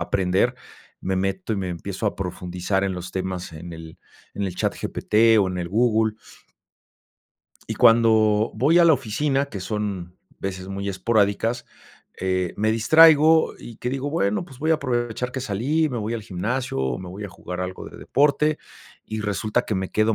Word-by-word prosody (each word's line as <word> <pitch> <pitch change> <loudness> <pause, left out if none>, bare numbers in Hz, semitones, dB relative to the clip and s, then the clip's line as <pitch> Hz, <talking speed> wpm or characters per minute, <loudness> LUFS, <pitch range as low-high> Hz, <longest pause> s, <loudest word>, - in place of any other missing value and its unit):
aprender. 95 +7 +1 0.5
Me 95 0 -1
meto, 95 +2 -2
y 105 - -1
me 95 -2 -3
empiezo 95 +4 -4
a - - -1
profundizar 90 +1 -2
en 100 -1 0
los 90 0 -7
temas, 95 -2 -4
en 85 +2 -8
el 80 0 -11 0.4
en 100 - -3
el 95 -3 -3
chat - - 0
GPT 110 +1 +2
o 100 -2 +3
en 90 0 -4
el 85 -1 -3
Google. 110 +1 +2 1.5
Y - - -3
cuando 110 -2 +4
voy 145 +10 +4
a 170 - +6
la 165 - +7
oficina, 135 +2 0
que 105 -8 -7
son 95 -3 -4 0.2
veces 95 -1 -5
muy 100 +1 -4
esporádicas, 110 +3 0 0.5
eh, 95 -1 0
me 110 +1 +1
distraigo, 160 +6 +6
y 115 - -10
que 125 - -3
digo: 135 +2 -3
"Bueno, 105 - 0
pues 135 -7 -15
voy 155 +3 0
a - - +5
aprovechar 125 -3 -2
que 130 - -3
salí". 135 +10 0
Me 125 - -4
voy 110 +2 -3
al 115 - -4
gimnasio, 115 - -3
o 65 -2 -1
me 90 - -8
voy 95 +4 -7
a - - -5
jugar 90 0 -7
algo 90 0 -5
de - - -13
deporte. 150 +2 +2 0.5
Y 110 0 -4
resulta, 105 0 -1
que 110 - -3
me 95 -1 -2
quedo 110 +1 +2
105 Hz, 185 wpm, -23 LUFS, 95-120 Hz, 1.5 s, la